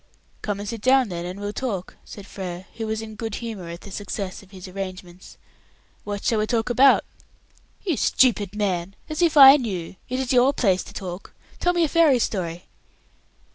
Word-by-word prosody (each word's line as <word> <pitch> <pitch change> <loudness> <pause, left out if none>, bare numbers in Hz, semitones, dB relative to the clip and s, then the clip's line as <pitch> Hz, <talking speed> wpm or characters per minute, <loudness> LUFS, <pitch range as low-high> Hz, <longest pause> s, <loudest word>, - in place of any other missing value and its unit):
"Come 205 -1 -3
and 205 - -6
sit 230 0 -5
down 255 0 +4
then," 175 +2 -5 0.7
said 205 - -10
Frere, 185 -2 -7
who 225 -1 -3
was 220 0 -3
in 220 0 -8
good 220 -1 -5
humour 215 -7 -6
at 170 +1 -8
the 200 - -11
success 195 -1 -5
of 195 - -19
his 190 -1 -10
arrangements. 185 -1 -8 0.7
"What 205 -1 -5
shall 225 - +1
we 215 - 0
talk 230 +1 0
about?" 270 +3 +5 0.8
"You 350 -6 +1
stupid 210 -6 +2
man! 195 -3 -2
As 310 +2 -3
if 330 -3 +3
I 275 0 +11
knew! 190 - -5
It 255 +1 -2
is 265 -1 -1
your 255 +3 +5
place 190 -8 +2
to - - -12
talk. 185 -1 -7 0.2
Tell 355 - +2
me 345 -1 +2
a - - +3
fairy 315 -4 +4
story." 180 -7 -3
210 Hz, 180 wpm, -23 LUFS, 185-250 Hz, 0.8 s, I